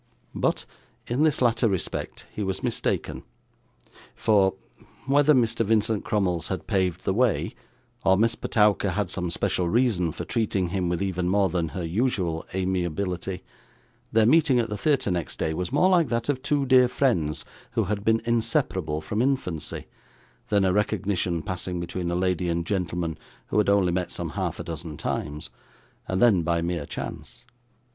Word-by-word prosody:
But, - - 0 0.4
in 125 +4 -1
this 155 -4 +3
latter 115 -1 +3
respect 95 -3 -4
he - - -4
was 95 -2 -2
mistaken; - - -1 0.9
for 100 -3 +3 0.5
whether 145 +2 +4
Mr. 115 -2 +2
Vincent 110 0 +1
Crummles 90 -5 0
had 95 - -4
paved 95 -4 0
the 95 - +2
way, 120 0 +1 0.5
or 95 0 +4
Miss 115 +2 +3
Petowker 105 -4 +2
had 100 -2 -1
some 90 -2 -2
special 85 +1 0
reason 105 -7 +2
for - - -6
treating 100 -5 0
him 90 -1 -1
with 90 +2 -1
even 90 -2 -1
more 100 0 +3
than 85 -2 -1
her 85 +3 -4
usual 90 -4 -1
amiability 90 0 -2 0.7
their 110 -1 +4
meeting 145 0 +5
at 115 -1 0
the 105 - -3
theatre 140 -4 +1
next 85 -3 -3
day 80 - -1
was 90 +2 -3
more 185 - +4
like 175 -4 +3
that 115 +2 -1
of 135 -3 0
two 145 0 +1
dear 130 -1 +6
friends 120 - 0 0.3
who 115 -2 +2
had 100 +1 -2
been 110 +1 +2
inseparable 115 - 0
from 105 +8 -2
infancy, 125 - -1 0.6
than 100 -2 +3
a 95 - +2
recognition 95 -4 0
passing 90 0 -4
between 85 0 -3
a 85 - -1
lady 90 -1 0
and 85 0 -1
gentleman 85 -4 -2 0.3
who 105 - +2
had 105 - +2
only 100 -3 +3
met 90 0 -1
some - - -4
half - - -3
dozen 80 -2 -6
times, 75 +1 -4 0.6
and 95 - -1
then 105 -6 +5
by 85 0 +1
mere 85 -3 -2
chance. 75 -7 -7
95 Hz, 165 wpm, -26 LUFS, 85-115 Hz, 0.9 s, dear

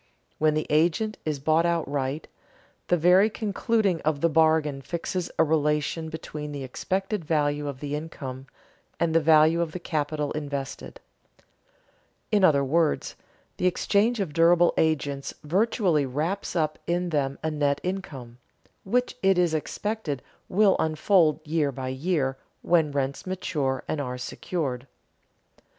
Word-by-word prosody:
When 155 0 +3
the 155 - 0
agent 170 +8 +1
is 155 -2 -1
bought 155 +4 +2
outright, 145 -4 -1 0.6
the 175 - +3
very 180 +6 +5
concluding 215 -3 0
of 150 -2 0
the 170 - +3
bargain 155 -3 +2
fixes 170 +3 -3
a - - +5
relation 150 +1 0
between 150 -2 -6
the 140 -2 -5
expected 190 - -2
value 145 -2 0
of 140 -2 -6
the 145 -1 -4
income 135 -4 -6 0.5
and 170 -1 +1
the 165 - +5
value 160 +1 +5
of 165 -2 -2
the 180 - -4
capital 150 -2 -2
invested. 145 - -5 1.3
In 205 -2 +3
other 145 -6 +5
words, 160 +3 0 0.4
the 180 - +2
exchange 210 +5 +1
of 180 -7 -2
durable 170 +2 +5
agents 145 -3 0
virtually 180 - +1
wraps 160 +12 -3
up 155 -2 0
in 175 +1 0
them 140 -4 -1
a 160 - 0
net 145 -2 0
income, 140 -11 -5 0.4
which 245 +6 0
it 195 -1 +3
is 175 -2 +2
expected 160 - -3 0.3
will 200 +1 +4
unfold 160 0 +2
year 150 -2 0
by 130 -1 -5
year 135 -1 -1 0.3
when 165 -4 +3
rents 140 +3 -2
mature 150 -8 -2
and 150 - -2
are 125 -2 -4
secured. 130 -1 -4
155 Hz, 140 wpm, -26 LUFS, 145-175 Hz, 1.3 s, very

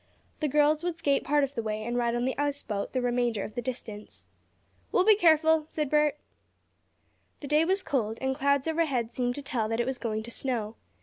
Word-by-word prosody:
The 305 - 0
girls 300 +2 +3
would 350 -2 -2
skate 280 -4 +1
part 295 0 +2
of 275 0 -2
the 235 - -2
way 215 -1 -3
and 240 +2 -3
ride 240 -1 +1
on 240 +1 0
the 260 - -1
ice 285 0 -2
boat 200 -2 -3
the 255 -1 -1
remainder 240 -3 0
of 215 - -7
the 245 - -3
distance. 225 -4 -7 0.7
"We'll 370 - +3
be 430 0 +7
careful," 320 -4 +4
said 300 -3 -3
Bert. 300 -1 +3 1.2
The 285 - -6
day 300 +3 +3
was 380 +2 +1
cold, 225 - -1
and 265 0 -1
clouds 280 +1 +1
overhead 285 -8 0
seemed 245 0 -1
to 285 - -6
tell 240 -6 -2
that 225 +1 -1
it 240 - +1
was 260 -1 -3
going 220 -2 -2
to 235 - -9
snow. 230 -4 -3
265 Hz, 220 wpm, -28 LUFS, 235-300 Hz, 1.2 s, be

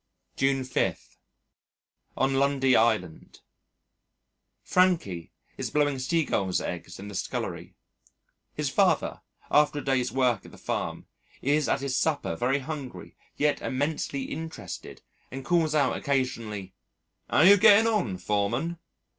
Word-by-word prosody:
June 135 -1 +1
5. 130 - -2 1.0
On 135 0 +2
Lundy 135 -1 +3
Island 110 -8 0 1.2
Frankie 165 - +1 0.3
is - - -3
blowing 145 -2 +1
Seagulls' 130 - 0
eggs 85 0 -6
in 100 - -9
the 100 - -8
scullery. 95 - -4 0.8
His - - -1
father, - - +1 0.3
after 150 0 +4
a 145 - -3
day's 130 -2 0
work 125 -5 +1
at - - -13
the - - -14
farm, - - -4 0.4
is 145 +2 +2
at 135 - +1
his 135 -2 -2
supper 155 0 0
very 130 +3 +1
hungry, 140 -1 -7 0.2
yet 145 0 +1
immensely 140 0 -2
interested, 145 - -7 0.3
and 135 0 -7
calls 160 -2 +2
out 145 - +2
occasionally, 115 -8 -2 0.6
"'Ow - - +3
you're 195 +5 +8
getting 210 +2 +7
on, 205 - 0
Foreman?" 105 - -1
135 Hz, 125 wpm, -27 LUFS, 115-150 Hz, 1.2 s, you're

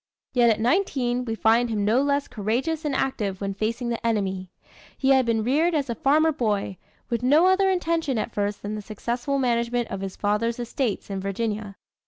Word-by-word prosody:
Yet 240 -2 +5
at 220 - +2
nineteen 250 - +1
we 225 -2 -2
find 230 +2 +3
him 210 -2 -1
no 230 +5 +3
less 280 0 0
courageous 260 +10 -2
and 285 -3 0
active 210 -9 -1
when 195 -1 -3
facing 230 +4 -2
the 235 0 -3
enemy. 190 -5 -1 0.5
He 265 - +1
had 265 -2 +4
been 225 -1 +1
reared 310 +8 +2
as 280 -5 0
a - - 0
farmer 305 +7 +3
boy, 210 -8 -1 0.3
with 235 -1 0
no 290 +7 +5
other 380 +1 +4
intention 330 -7 0
at 220 +1 -3
first 205 0 -2
than 205 +1 -4
the 215 - -4
successful 240 +6 -3
management 240 -2 0
of 195 - -5
his 195 -1 -5
father's 210 +3 0
estates 240 -3 -3
in 195 - -2
Virginia. 205 +1 -3
235 Hz, 195 wpm, -25 LUFS, 210-270 Hz, 0.5 s, Yet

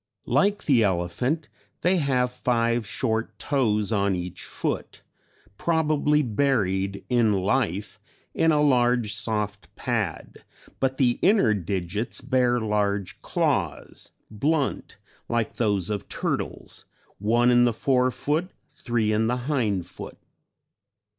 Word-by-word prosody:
Like 200 +1 +2
the 130 -6 +4
elephant 105 - 0 0.3
they 185 +2 +3
have 130 -5 +1
five 120 -2 0
short 115 +1 -2
toes 110 -7 0
on 100 -2 +2
each 90 0 -6
foot, - - -4 0.6
probably 150 -2 +2
buried 100 -6 0
in 120 -4 +3
life 100 0 -1 0.3
in 165 - +3
a 150 -1 +3
large 120 -5 +3
soft 105 -2 -2
pad, - - -3 0.4
but 130 0 0
the 125 -3 +2
inner 195 - +4
digits 100 +3 -2
bear 125 -2 +2
large 105 -3 -1
claws, - - -1 0.2
blunt 140 +6 -1 0.3
like 115 -2 -1
those 105 -4 0
of 100 -3 -4
turtles, - - -4 0.3
one 120 +4 +3
in 120 0 +5
the 120 - +3
fore 125 +2 +2
foot, 155 +7 -1 0.2
three 110 -3 -1
in 110 +1 +2
the 125 +2 0
hind 110 - 0
foot. 90 - -9
120 Hz, 120 wpm, -25 LUFS, 105-135 Hz, 0.6 s, in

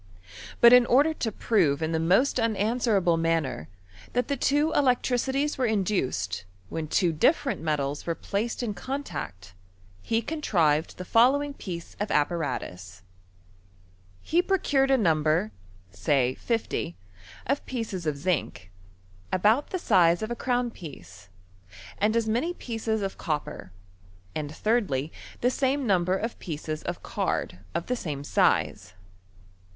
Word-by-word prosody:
But 235 +1 +9
in 250 -1 +7
order 290 +6 +4
to 230 -7 -2
prove 175 -11 +2
in 160 - -1
the 160 - 0
most 190 - +3
un 230 -1 +1
answerable 205 -5 +2
manner 165 - -1 0.4
that 245 -1 0
the 280 - +1
two 295 +3 +1
electricities 265 +2 +1
were 255 - +2
induced 180 - -1 0.3
when 160 -1 -4
two 170 +1 +2
diiferent 270 - +2
metals 145 -2 -2
were 165 - 0
placed 220 +7 -3
in 220 -3 -2
con 275 +7 -4
tact, 95 - -7 0.5
he 225 0 0
contrived 170 - +1
the 180 - -6
following 275 +7 +3
piece 175 -10 -7
of 210 - -2
apparatus: 100 - -2 1.2
He 340 +2 +2
procured 290 -8 +1
a 270 - +5
number 155 - +2 0.4
(say 125 +7 +1
50) 225 - -2 0.5
of 275 +3 0
pieces 215 -9 -4
of 150 -2 -1
zinc, 145 - -2 0.6
about 215 +9 +3
the 370 - -2
size 175 - +3
of 220 - -4
a - - -1
crovm 245 -1 -1
piece, 95 - -11 0.7
and 215 +2 +2
as 230 -1 +1
many 250 +11 0
pieces 225 - -3
of 195 - -4
copper, 150 - -4 0.6
and 150 -1 -4
thirdly, 165 - 0 0.3
the 245 - +3
same 270 +1 0
number 185 -3 +2
of 225 +4 -4
pieces 155 -1 -5
of 175 0 -5
card 90 - -2 0.2
of 170 - -1
the 250 - -1
same 150 - -5
size. 95 -8 +1
195 Hz, 140 wpm, -27 LUFS, 155-245 Hz, 1.2 s, But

